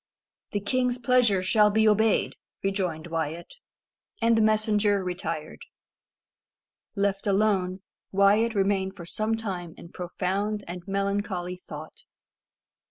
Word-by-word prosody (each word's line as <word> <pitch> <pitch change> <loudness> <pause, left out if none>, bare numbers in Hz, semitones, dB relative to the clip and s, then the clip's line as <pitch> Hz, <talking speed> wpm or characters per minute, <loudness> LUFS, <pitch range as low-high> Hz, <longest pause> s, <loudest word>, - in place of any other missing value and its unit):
"The 205 - -1
king's 250 +4 0
pleasure 235 -6 +3
shall 210 +2 +5
be 220 +1 +3
obeyed," 215 +1 +3 0.3
rejoined 185 -5 -1
Wyat. 165 0 -4 0.7
And 230 0 +3
the 225 - +3
messenger 215 -2 +2
retired. 165 -4 -4 1.4
Left 200 0 0
alone, 195 -2 +1 0.3
Wyat 205 +4 +3
remained 195 -1 +1
for 170 - -9
some 215 +5 -1
time 180 -6 -5
in 170 - -11
profound 195 +4 -2
and 175 +1 -6
melancholy 195 -2 -2
thought. 155 -3 -10
200 Hz, 110 wpm, -26 LUFS, 180-215 Hz, 1.4 s, shall